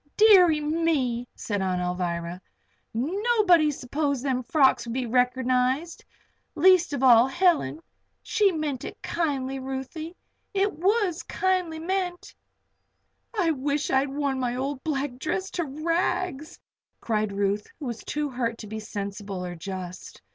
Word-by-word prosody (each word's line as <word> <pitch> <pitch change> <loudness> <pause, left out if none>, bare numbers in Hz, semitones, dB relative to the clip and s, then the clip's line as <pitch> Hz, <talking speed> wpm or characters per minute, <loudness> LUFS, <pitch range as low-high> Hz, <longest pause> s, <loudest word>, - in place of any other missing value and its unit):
"Deary 370 -8 +7
me!" 295 -6 0
said 205 -2 -3
Aunt 185 -1 0
Alvirah. 180 -1 -3 0.5
"Nobody 360 - +3
supposed 280 0 -2
them 255 -2 0
frocks 265 -1 +3
would 230 - -4
be 260 -1 -1
reckernized 255 +5 +1 0.5
least 365 +1 +5
of 270 -2 -2
all 240 -1 +7
Helen. 345 0 +2 0.4
She 415 -3 +2
meant 300 -6 -3
it - - -8
kindly, 270 -5 -1
Ruthie. 270 +6 -6 0.4
It 400 +1 +2
was 380 -1 +1
kindly 370 -4 -1
meant." 355 +1 -3 1.1
"I 335 -4 +3
wish 285 0 -1
I'd 270 +1 +2
worn 275 -1 -1
my 245 -1 -1
old 265 +1 -3
black 275 -5 -2
dress 375 +6 -2
to 345 - -2
rags!" 320 +1 -2 0.4
cried 215 -2 -1
Ruth, 200 +1 0
who 295 - -6
was 235 -3 -5
too 300 0 -2
hurt 240 -3 -2
to 215 - -9
be 220 +1 -5
sensible 200 -2 -5
or 175 - -5
just. 180 +1 -7
275 Hz, 135 wpm, -26 LUFS, 240-330 Hz, 1.1 s, Deary